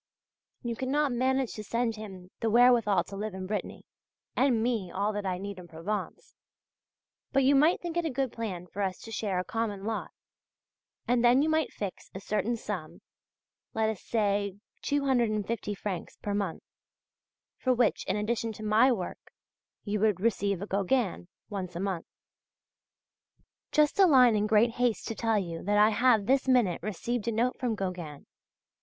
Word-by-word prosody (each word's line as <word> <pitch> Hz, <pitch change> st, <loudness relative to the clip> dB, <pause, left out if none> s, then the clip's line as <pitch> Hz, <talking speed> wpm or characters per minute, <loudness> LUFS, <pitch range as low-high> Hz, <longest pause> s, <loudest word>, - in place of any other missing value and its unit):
You 235 Hz, -1 st, -2 dB
cannot 275 Hz, +3 st, 0 dB
manage 260 Hz, +1 st, +1 dB
to 215 Hz, -, -6 dB
send 230 Hz, +1 st, -1 dB
him 190 Hz, -4 st, -10 dB
the 225 Hz, -, 0 dB
wherewithal 235 Hz, -3 st, +5 dB
to 200 Hz, -, -10 dB
live 210 Hz, 0 st, -4 dB
in 190 Hz, 0 st, -5 dB
Brittany, 205 Hz, +2 st, -4 dB, 0.5 s
and 250 Hz, -4 st, +3 dB
me 230 Hz, -7 st, -1 dB
all 200 Hz, +4 st, -1 dB
that 205 Hz, -1 st, -3 dB
I 180 Hz, -1 st, -1 dB
need 200 Hz, 0 st, -6 dB
in 180 Hz, -, -11 dB
Provence; 170 Hz, +6 st, -5 dB, 1.0 s
but 275 Hz, -1 st, +3 dB
you 270 Hz, +2 st, +5 dB
might 300 Hz, +5 st, +4 dB
think 345 Hz, -1 st, -5 dB
it 345 Hz, -, +1 dB
a -, -, +1 dB
good 265 Hz, -2 st, -1 dB
plan 195 Hz, -6 st, -5 dB
for 190 Hz, +3 st, -6 dB
us 190 Hz, -2 st, -1 dB
to 225 Hz, -, -10 dB
share 205 Hz, -4 st, -2 dB
a 180 Hz, -, 0 dB
common 210 Hz, -2 st, -3 dB
lot, 220 Hz, +1 st, -3 dB, 1.0 s
and 245 Hz, 0 st, +2 dB
then 245 Hz, +3 st, +5 dB
you 315 Hz, -, +1 dB
might 315 Hz, -2 st, +1 dB
fix 200 Hz, -3 st, -6 dB
a -, -, -4 dB
certain 215 Hz, +4 st, -1 dB
sum 185 Hz, -8 st, -6 dB, 0.7 s
(let 220 Hz, 0 st, +2 dB
us 215 Hz, -, -8 dB
say 200 Hz, -3 st, 0 dB, 0.3 s
250 235 Hz, -7 st, 0 dB
francs 195 Hz, -3 st, -5 dB
per 205 Hz, -, -3 dB
month) 200 Hz, -5 st, -2 dB, 1.0 s
for 255 Hz, -, +1 dB
which, 250 Hz, -1 st, +2 dB
in -, -, +1 dB
addition 225 Hz, +2 st, -1 dB
to 215 Hz, -, -9 dB
my 220 Hz, +5 st, +4 dB
work, 185 Hz, -7 st, -4 dB, 0.5 s
you 210 Hz, 0 st, -2 dB
would 210 Hz, -3 st, +2 dB
receive 200 Hz, -3 st, 0 dB
a -, -, -3 dB
Gauguin 200 Hz, -1 st, 0 dB, 0.2 s
once 185 Hz, -4 st, -5 dB
a -, -, -3 dB
month. 190 Hz, -3 st, -3 dB, 1.6 s
Just 300 Hz, +4 st, +3 dB
a 385 Hz, -, +8 dB
line 250 Hz, -7 st, +6 dB
in 210 Hz, 0 st, +1 dB
great 220 Hz, +2 st, +4 dB
haste 240 Hz, -1 st, 0 dB
to -, -, -2 dB
tell 225 Hz, -1 st, +1 dB
you 170 Hz, -4 st, -3 dB
that 205 Hz, +2 st, +1 dB
I 210 Hz, +1 st, +6 dB
have 225 Hz, -2 st, +3 dB
this 270 Hz, +3 st, +2 dB
minute 240 Hz, -9 st, +3 dB
received 220 Hz, +3 st, -3 dB
a -, -, +2 dB
note 235 Hz, +3 st, 0 dB
from 240 Hz, -3 st, 0 dB
Gauguin. 180 Hz, -7 st, -5 dB
215 Hz, 175 wpm, -29 LUFS, 200-245 Hz, 1.6 s, a